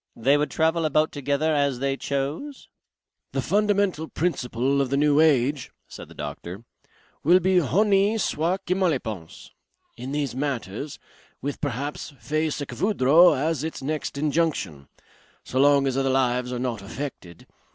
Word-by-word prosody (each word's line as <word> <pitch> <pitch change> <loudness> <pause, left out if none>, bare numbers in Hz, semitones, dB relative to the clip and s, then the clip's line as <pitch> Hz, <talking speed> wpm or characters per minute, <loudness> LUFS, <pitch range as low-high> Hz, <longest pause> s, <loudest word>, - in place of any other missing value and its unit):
They 135 +5 +3
would 150 +1 +1
travel 160 +1 +1
about 155 0 +2
together 145 +2 0
as 140 -3 +1
they 135 +1 -1
chose?" 140 - -4 0.7
"The - - -1
fundamental 200 -5 +1
principle 140 -5 -1
of 135 - -1
the 140 - 0
new 145 0 +3
age," 140 -3 +2 0.2
said - - -10
the - - -15
doctor, 85 +8 -7 0.6
"will 175 +5 +6
be 185 0 +3
Honi 200 - +2
soit 180 -2 -1
qui 180 - +1
mal 185 -1 +2
y 150 - +1
pense. 105 -10 -8 0.5
In 125 +3 -6
these 145 -3 -2
matters. 135 -1 -4 0.4
With 140 +1 -5
perhaps 145 +1 -4
Fay 155 +1 -1
ce 145 -1 -4
que - - -8
vouldras 175 -4 +5
as 155 +1 -1
its 160 -4 -5
next 150 0 -3
injunction. 145 - -1 0.6
So 130 - -3
long 140 0 +5
as 135 -2 0
other 135 0 +1
lives 125 -1 +1
are 125 - -3
not 120 -4 -3
affected. 100 - -8
145 Hz, 160 wpm, -24 LUFS, 130-160 Hz, 0.7 s, will